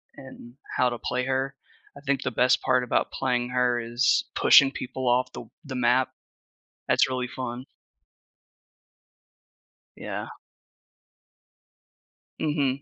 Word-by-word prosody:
and 130 -3 -12 0.2
how 125 - +3
to 120 - -5
play 125 +2 -2
her. 135 +1 -1 0.4
I - - -12
think 140 -1 -1
the 130 - -2
best 125 +2 +3
part 125 -1 +2
about 125 - 0
playing 125 -2 -1
her 125 -1 +1
is 120 +3 +1
pushing 140 -2 +6
people 130 -1 -5
off 125 +1 +2
the - - -7
w 115 - -16
the 135 -2 -6
map. 125 +1 +2 0.8
That's - - +3
really 130 -1 -2
fun. 125 0 -6 2.3
Yeah. - - -5 2.1
Mhm. 140 -3 0
125 Hz, 120 wpm, -26 LUFS, 125-135 Hz, 2.3 s, pushing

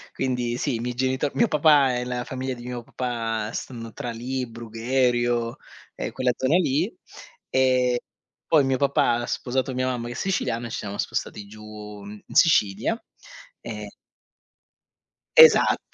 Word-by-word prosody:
Quindi 125 -2 -1
sì, 140 -2 -1
i 115 - -3
miei 125 +1 -3
genito 130 +2 0
mio 235 - +3
papà 145 - +4
e 125 - -3
la 125 0 -3
famiglia 130 0 -4
di 120 -1 -10
mio 125 -1 -5
papà 115 -3 -3
stanno 115 -3 -6
tra 120 - -5
lì, 125 +2 -3
Brugherio 120 +1 0 0.4
e - - -4
quella 125 -1 +1
zona 130 +6 +1
lì 170 - +1 0.6
e 125 -2 +2 0.5
poi 155 -4 +5
mio 135 -1 +1
papà 135 -3 +2
ha - - -3
sposato 130 +1 -2
mia 130 0 -1
mamma 120 -2 -2
che 120 - -5
è - - -11
siciliana 120 -11 -1
e - - -9
ci - - -4
siamo 100 -1 -5
spostati 105 - -3
giù 105 -1 -10
in 105 0 -10
Sicilia 135 - +3 0.6
e - - -7 1.5
Esatt 475 0 +8
125 Hz, 155 wpm, -24 LUFS, 115-130 Hz, 1.5 s, Esatt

